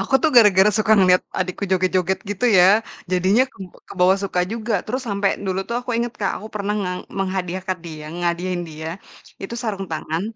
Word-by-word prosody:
Aku 270 - -2
tuh 315 - +3
gara-gara 210 -3 +7
suka 215 0 +3
ngeliat 185 -1 +5 0.2
adikku 185 +1 -3
joget-joget 185 0 +1
gitu 205 +3 -2
ya. 195 +5 +6 0.3
Jadinya 185 +6 +3
keb 190 -7 -10 0.2
kebawa 185 0 +3
suka 190 -2 -1
juga. 230 0 -3
Terus 255 +4 -3
sampe 200 -1 -1 0.2
dulu 190 0 -1
tuh 235 - -1
aku 250 - -6
inget, 235 0 -1
Kak, 195 - 0
aku - - -7
pernah 205 0 -2
ngeng 180 -2 -3 0.2
menghadiahkan 185 -1 -2
dia 155 -2 -8
ngehadiahkan 175 +1 -2
dia. 160 0 -7 0.5
Itu 195 - -5
sarung 200 -4 -3
tangan, 160 +1 -3
190 Hz, 180 wpm, -21 LUFS, 180-210 Hz, 0.5 s, gara-gara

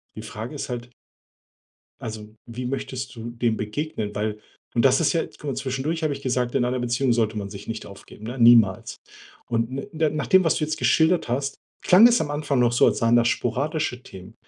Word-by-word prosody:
Die 110 - -7
Frage 110 +4 -7
ist 140 - -5
halt 120 0 -5 1.1
also, 110 -1 -7
wie 125 +2 -6
möchtest 130 0 -5
du 115 0 -7
dem 115 -2 -1
begegnen? 110 -1 -4
Weil 105 0 -2 0.4
und 115 - +3
das 130 - +5
ist 165 - +2
ja 165 - +1
guck - - -20
mal, 140 - -2
zwischendurch 135 +5 -3
habe 155 -2 +1
ich 140 - -8
gesagt: 125 -1 -1
„In 120 - +2
einer 125 +1 -1
Beziehung 120 +1 +1
sollte 110 -2 0
man 100 -1 -4
sich 100 0 -10
nicht 115 -1 -5
aufgeben“, 100 +2 -13
ne, 125 +3 -6
niemals. 115 -5 +5 0.5
Und 120 +3 -2
na 155 -1 +1
nach 155 -1 -3
dem, 190 -1 +5
was 165 - +2
du - - -1
jetzt 155 +1 -2
geschildert 160 -4 +2
hast, 140 +3 -2 0.3
klang 195 +6 +8
es 240 - +3
am 145 -2 -3
Anfang 145 -2 -1
noch 120 -1 +3
so, 120 - +4
als - - +1
seien 115 0 +3
das 120 0 +4
sporadische 145 0 -1
Themen. 95 +3 -12
125 Hz, 210 wpm, -24 LUFS, 115-145 Hz, 1.1 s, klang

